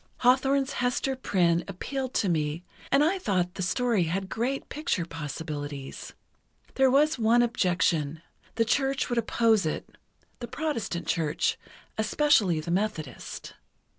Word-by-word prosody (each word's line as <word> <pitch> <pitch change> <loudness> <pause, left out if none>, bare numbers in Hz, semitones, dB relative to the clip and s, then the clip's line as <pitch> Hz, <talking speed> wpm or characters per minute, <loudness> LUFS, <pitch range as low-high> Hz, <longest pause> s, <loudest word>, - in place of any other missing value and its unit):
Hawthorne's 270 +2 +3
Hester 250 +2 0
Prynne 175 -8 +2
appealed 260 +7 -4
to 205 - +2
me, 155 -1 -1 0.3
and 275 +1 +5
I 365 +5 +2
thought 180 - 0
the 190 - -5
story 200 +1 +1
had 190 +4 -2
great 255 +5 -2
picture 295 - -2
possibilities. 145 -3 -6 0.6
There 265 -1 +4
was 295 +2 +3
one 230 +2 +4
objection: 175 -8 +1 0.3
the 230 0 +2
Church 270 +3 +1
would 240 -1 +1
oppose 225 -2 +2
it—the 240 +8 -8
Protestant 235 - -3
Church, 155 -3 0 0.4
especially 220 - +3
the 155 +2 -4
Methodist. 180 -8 -3
215 Hz, 125 wpm, -27 LUFS, 170-260 Hz, 0.6 s, and